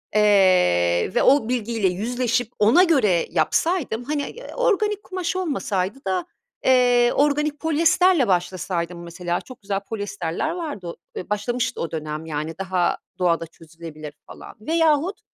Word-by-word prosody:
eee, 185 - +4
ve - - +3
o 260 -4 +4
bilgiyle 230 -4 0
yüzleşip 235 +4 -1
ona 225 - +6
göre 220 - +2
yapsaydım. 320 -10 0
Hani, 290 +2 -2
eee, - - -10
organik 425 -4 +1
kumaş 370 -1 -3
olmasaydı 270 - -2
da, 185 -2 -1 0.4
eee, 245 -2 +4
organik 295 +1 +1
polyesterle 325 -1 +3
başlasaydım 175 -1 -2
mesela 175 0 -3
çok 255 -4 -13
güzel 195 -1 -2
polyesterler 205 - -3
vardı 305 - -5
o 170 - -6 0.2
eee, 185 - -6
başlamıştı 235 +4 -2
o 165 - -3
dönem, 155 0 -5
yani, 155 0 -4
daha 185 -2 0 0.2
doğada 170 -2 +1
çözülebilir 160 -2 -11
falan. - - -12
Veyahut, 325 - +1
215 Hz, 135 wpm, -22 LUFS, 175-295 Hz, 0.4 s, ona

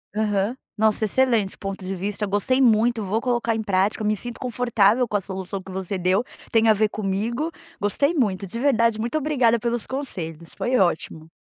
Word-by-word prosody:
Aham. 210 +1 0 0.2
Nossa, 220 0 +2
excelente 230 -3 +1
ponto 195 -1 -5
de 190 +1 -3
vista, 205 +3 -3
gostei 205 +7 +1
muito, 230 -2 +3
vou 205 +4 0
colocar 240 -2 0
em 220 - -2
prática, 200 +1 +1
eu - - 0
me 215 - +2
sinto 240 +3 -7
confortável 240 -2 +2
com 210 - 0
a 200 - -4
solução 190 0 -5
que 190 0 -11
você 190 +1 -3
deu, 185 +4 +2 0.3
tem 225 0 +4
a - - +7
ver 215 +1 +2
comigo, 220 +10 -2 0.3
gostei 280 - +1
muito, 205 - 0
de 230 +5 -5
verdade, 230 -5 +2
muito 235 +7 -1
obrigada 260 -6 +2
pelos 235 0 -2
conselhos, 170 - -6
foi 255 +1 0
ótimo. 160 -3 0
215 Hz, 190 wpm, -23 LUFS, 195-240 Hz, 0.3 s, a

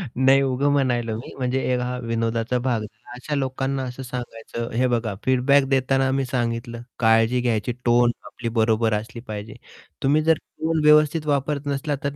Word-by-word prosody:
नाही 135 +2 +5
उगं 135 +1 +1
म्हणालो 120 -5 0
मी 120 - -9
म्हणजे 130 0 -1
एक 125 - +1
हा 125 0 -3
विनोदाचा 115 +1 -1
भाग 125 -2 0
झाला. 110 +2 -12
अशा 145 +4 -4
लोकांना 135 0 -2
असं 125 +1 -6
सांगायचं, 120 -2 -6
हे 125 +3 +2
बघा 115 -3 -1
फीडबॅक 130 +2 +4
देताना 135 0 +2
मी 135 0 0
सांगितलं, 120 -2 -3 0.2
"काळजी 115 +2 +3
घ्यायची, 120 -1 0
टोन 120 0 +4
आपली 120 -1 -5
बरोबर 110 -1 +2
असली 115 +3 -4
पाहिजे. 105 0 -6 0.5
तुम्ही 145 +3 +3
जर 160 +1 +5
टोन 160 +2 -3
व्यवस्थित 150 +1 +4
वापरत 145 0 0
नसला 145 +1 -1
तर 140 0 -2
125 Hz, 170 wpm, -23 LUFS, 115-135 Hz, 0.5 s, नाही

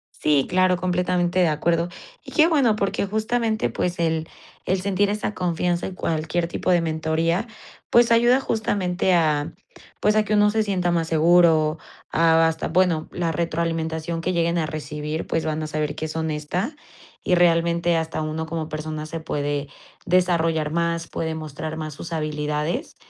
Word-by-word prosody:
Sí, 145 -3 +2
claro, 185 0 +3
completamente 180 0 0
de 180 - +4
acuerdo. 165 +2 0 0.3
Y - - -11
qué 320 -1 +5
bueno, 275 -10 +3
porque 200 -1 -1
justamente 220 +1 0
pues 180 -1 -2
el 160 -1 0 0.4
el 190 +1 +1
sentir 200 +1 +1
esa 210 0 -2
confianza 175 -1 -1
y 190 - -7
cualquier 165 0 -1
tipo 170 - -3
de 175 -2 +4
mentoría 165 +5 0 0.4
pues 235 0 +5
ayuda 240 +3 +5
justamente 195 -7 0
a 155 -2 +1 0.5
pues 210 0 +2
a 215 - +4
que 215 0 -2
uno 210 0 +4
se 220 +1 +1
sienta 185 -4 0
más 165 -1 0
seguro, 160 -1 +4 0.3
a 165 0 +4
hasta 160 0 -2
bueno, 175 -2 +1
la 170 -2 -1
retroalimentación 165 0 -2
que 180 +2 -1
lleguen 170 0 +1
a 160 - 0
recibir, 150 0 -4
pues 165 - -1
van 155 0 -2
a - - -3
saber 150 -1 -2
que 155 - -4
es 155 - -6
honesta. 160 - -2 0.5
y 180 - +2
realmente 170 0 +3
hasta 160 -1 -2
uno 155 +1 -3
como 160 -1 -3
persona 155 0 -5
se 160 +2 -5
puede 145 -2 -2 0.4
desarrollar 165 -4 +2
más, 170 0 -1
puede 160 -1 -3
mostrar 155 0 -6
más 155 -1 -5
sus 165 +3 -8
habilidades 150 0 -2
165 Hz, 165 wpm, -23 LUFS, 155-180 Hz, 0.5 s, qué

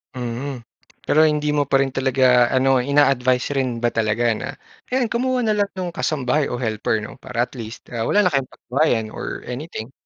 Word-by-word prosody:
Mhm, 125 +1 -4 0.4
pero 155 +1 +4
hindi 150 -1 0
mo 145 -1 +1
pa 135 - +1
rin 135 - -3
talaga 130 -2 +3
ano, 130 0 +4
ina-advice 130 -1 +2
rin 130 -4 -1
ba 120 - +2
talaga 110 +1 0
na 110 - -4 0.3
ayan, 250 -3 0
kumuha 250 +1 0
na 220 - +2
lang 205 -1 +1
nung 180 -2 -3
kasambahay 150 -3 0
o - - -3
helper 110 -2 -1
'no, 125 - -9
para 120 -2 -1
at - - -6
least, 115 -3 -9
ah, 115 -2 -2
wala 210 - +4
na 180 - +2
kayong 135 -2 0
pag-awayan 125 -5 0
or - - -6
anything. 125 -2 -6
130 Hz, 190 wpm, -21 LUFS, 120-150 Hz, 0.4 s, pero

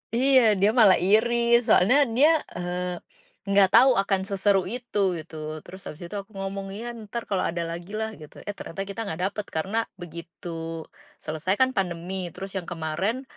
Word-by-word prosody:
Iya, 260 +2 +5 0.2
dia 200 +2 +4
malah 215 -6 +6
iri 220 +6 +3 0.3
soalnya 220 +8 +5 0.2
dia, 285 +6 +6 0.3
eee, 180 0 -3 0.5
enggak 200 -1 +5
tahu 260 +3 +8
akan 195 -1 0
seseru 195 0 +2
itu 240 0 -4 0.2
gitu, 160 0 -9 0.3
terus 185 +1 -11
abis 155 +4 -8
itu 170 +4 -7
aku 195 - -22
ngomong, 195 0 -4
"Ya, 240 +1 -4
ntar 225 +3 -5
kalau 195 - +1
ada 170 0 -2
lagi 170 +3 -7
lah," 220 0 -1
gitu, 150 - -13
eh, - - -1
ternyata 195 +4 -5
kita 200 +2 -7
enggak 160 -2 -4
dapet 210 0 -5
karena 190 +8 -1 0.2
begitu 165 -1 -7 0.4
selesai 160 +4 -1
kan 260 +3 +3
pandemi 180 -3 -3
terus 195 0 -7
yang 180 - -5
kemarin, 175 - -2
195 Hz, 170 wpm, -25 LUFS, 175-215 Hz, 0.5 s, tahu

